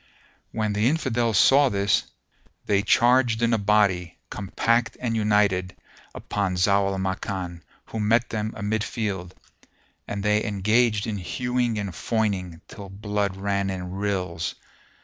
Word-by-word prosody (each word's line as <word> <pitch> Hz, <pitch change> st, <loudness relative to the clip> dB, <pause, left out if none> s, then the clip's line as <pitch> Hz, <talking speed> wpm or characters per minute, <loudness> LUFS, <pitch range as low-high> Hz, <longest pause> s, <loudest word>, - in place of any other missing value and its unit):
When 110 Hz, -2 st, -1 dB
the 105 Hz, +4 st, +2 dB
Infidels 120 Hz, -8 st, 0 dB
saw 140 Hz, +5 st, +6 dB
this, 100 Hz, -1 st, +1 dB, 0.6 s
they 100 Hz, -1 st, +2 dB
charged 120 Hz, +1 st, +3 dB
in 115 Hz, 0 st, +3 dB
a 115 Hz, -, +2 dB
body, 100 Hz, -4 st, +2 dB
compact 115 Hz, +5 st, 0 dB
and 115 Hz, -2 st, -2 dB
united, 105 Hz, -4 st, +1 dB, 0.4 s
upon 100 Hz, -3 st, -2 dB
Zau 100 Hz, +2 st, +2 dB
al 95 Hz, -, -3 dB
Makan, 95 Hz, -2 st, -3 dB, 0.2 s
who 110 Hz, -, -6 dB
met 115 Hz, +3 st, +2 dB
them 110 Hz, 0 st, -2 dB
amidfield, 105 Hz, -3 st, -3 dB, 0.7 s
and 100 Hz, -1 st, -4 dB
they 105 Hz, 0 st, +2 dB
engaged 105 Hz, +1 st, +1 dB
in 110 Hz, -3 st, -3 dB
hewing 120 Hz, +4 st, -1 dB
and 100 Hz, -2 st, -3 dB
foining, 95 Hz, -5 st, -2 dB
till 100 Hz, -2 st, -10 dB
blood 100 Hz, 0 st, -2 dB
ran 100 Hz, 0 st, -1 dB
in 90 Hz, -1 st, -5 dB
rills. 95 Hz, -4 st, -2 dB
105 Hz, 130 wpm, -24 LUFS, 95-115 Hz, 0.7 s, saw